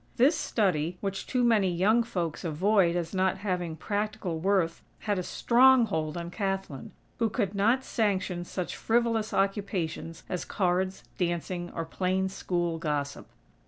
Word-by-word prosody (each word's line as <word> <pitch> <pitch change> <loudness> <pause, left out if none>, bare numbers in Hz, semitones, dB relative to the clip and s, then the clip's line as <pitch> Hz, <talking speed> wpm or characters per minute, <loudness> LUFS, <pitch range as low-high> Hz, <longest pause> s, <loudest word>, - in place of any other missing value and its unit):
This 275 +7 +5
study, 180 -5 0
which 195 -1 -4
too 250 -1 +1
many 220 -5 +4
young 200 +7 +3
folks 175 -8 -3
avoid 175 +2 +2
as 170 -1 -2
not 190 0 +1
having 180 -5 -2
practical 205 -2 -2
worth 185 -2 +1 0.2
had 205 -3 0
a - - 0
strong 250 +6 +5
hold 155 -5 -2
on 170 0 -5
Kathlyn, 195 - -3 0.3
who 230 -1 +2
could 205 -3 -1
not 230 +6 +2
sanction 190 -7 -1
such 180 0 -4
frivolous 230 -1 +1
occupations 195 -5 -2
as 180 -2 -3
cards, 185 0 0 0.2
dancing, 175 0 -2
or 165 - -2
plain 185 +3 0
school 175 -3 -2
gossip. 145 -3 -3
190 Hz, 145 wpm, -28 LUFS, 170-210 Hz, 0.3 s, This